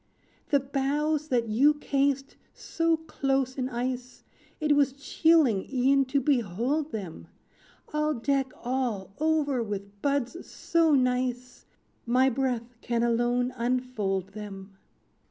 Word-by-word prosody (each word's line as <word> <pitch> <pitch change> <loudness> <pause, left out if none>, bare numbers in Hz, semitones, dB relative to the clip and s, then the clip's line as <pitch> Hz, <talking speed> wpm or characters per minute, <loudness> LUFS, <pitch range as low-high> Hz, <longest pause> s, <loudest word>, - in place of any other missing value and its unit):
"The 285 - +4
boughs 285 +3 -1
that 240 -5 +1
you 270 +8 +4
cased 275 -1 0 0.2
so 330 -1 0
close 270 -4 -1
in 255 -1 -2
ice, 250 +1 -4 0.4
It 300 -2 +3
was 280 -2 +3
chilling 285 - +2
e'en 270 +1 +3
to 280 +2 +1
behold 265 - 0
them, 195 -8 -6 0.7
I'll 300 0 +1
deck 270 +2 0
all 240 -6 -2
over 300 -4 +1
with 200 -2 -6
buds 280 +3 -1
so 325 -3 +2
nice; 250 -1 -1 0.4
My 255 +2 +4
breath 245 -2 -2
can 235 -1 -1
alone 240 +1 +1
unfold 235 -6 -1
them. 195 -1 -9
255 Hz, 120 wpm, -27 LUFS, 235-285 Hz, 0.7 s, The